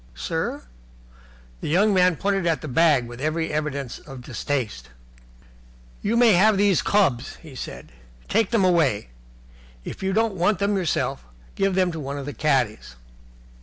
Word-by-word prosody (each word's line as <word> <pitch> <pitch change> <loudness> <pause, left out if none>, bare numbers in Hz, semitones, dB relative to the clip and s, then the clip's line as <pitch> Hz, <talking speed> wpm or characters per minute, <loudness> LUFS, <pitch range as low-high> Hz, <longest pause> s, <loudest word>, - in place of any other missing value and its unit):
"Sir?" - - -3 1.0
The - - -5
young 200 +6 +3
man 180 -2 +4
pointed 195 +1 0
at 165 -2 +1
the 155 - -6
bag 150 -2 +3
with 120 +1 -10
every 155 +1 -1
evidence 140 -4 -3
of 135 -3 -11
distaste. 110 - -3 1.1
"You 230 +3 0
may 235 -3 +6
have 205 +3 +4
these 200 -3 +3
clubs," 140 -12 +1
he 155 -4 -14
said. 130 - -8 0.4
"Take 220 -1 +1
them 230 -5 +2
away. 165 - +2 0.8
If - - -7
you 190 0 0
don't 220 +1 +1
want 190 +2 +1
them 200 +1 0
yourself, 170 - -1 0.3
give 195 -1 0
them 185 -1 +2
to 165 - -6
one 140 -1 -5
of 140 - -5
the 145 - -5
caddies." 125 - 0
165 Hz, 160 wpm, -24 LUFS, 135-195 Hz, 1.1 s, may